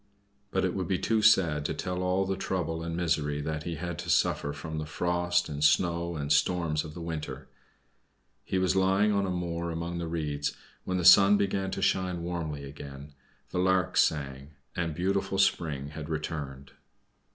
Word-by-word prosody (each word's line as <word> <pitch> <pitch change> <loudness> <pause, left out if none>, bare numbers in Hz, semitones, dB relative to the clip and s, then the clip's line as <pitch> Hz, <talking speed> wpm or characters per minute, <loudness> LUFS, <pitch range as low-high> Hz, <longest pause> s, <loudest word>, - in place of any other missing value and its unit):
But 95 -1 0
it 90 - 0
would 95 -2 -2
be 95 - +1
too 110 +2 +1
sad 95 -9 +4
to - - -1
tell 90 0 -3
all 90 +1 +1
the 95 0 -1
trouble 80 -4 -2
and 85 0 -4
misery 75 -4 0
that 75 0 -4
he 85 - -3
had 85 +3 -5
to - - -6
suffer 70 - +2
from 80 +2 -5
the 75 - -5
frost, 90 +2 0
and 75 0 -4
snow 85 +2 +2
and 75 -1 0
storms 80 0 +1
of 75 -1 -9
the 85 - -7
winter. 80 -2 -5 1.0
He 95 - -2
was 95 0 +2
lying 95 +2 +3
on 100 -1 +1
a - - -2
moor 85 -1 -2
among 85 +1 -4
the 85 - -3
reeds, 75 -3 -2 0.3
when 95 - -1
the 90 - -1
sun 100 +3 +8
began 95 -1 0
to - - -3
shine 90 -2 0
warmly 80 -5 -4
again; 70 +1 -9 0.4
the - - -1
larks 95 0 +3
sang, 70 -1 -3 0.2
and 85 -3 -2
beautiful 95 +2 0
spring 75 -7 +1
had 75 +1 -7
returned. 75 -4 -5
85 Hz, 185 wpm, -29 LUFS, 75-90 Hz, 1.0 s, sun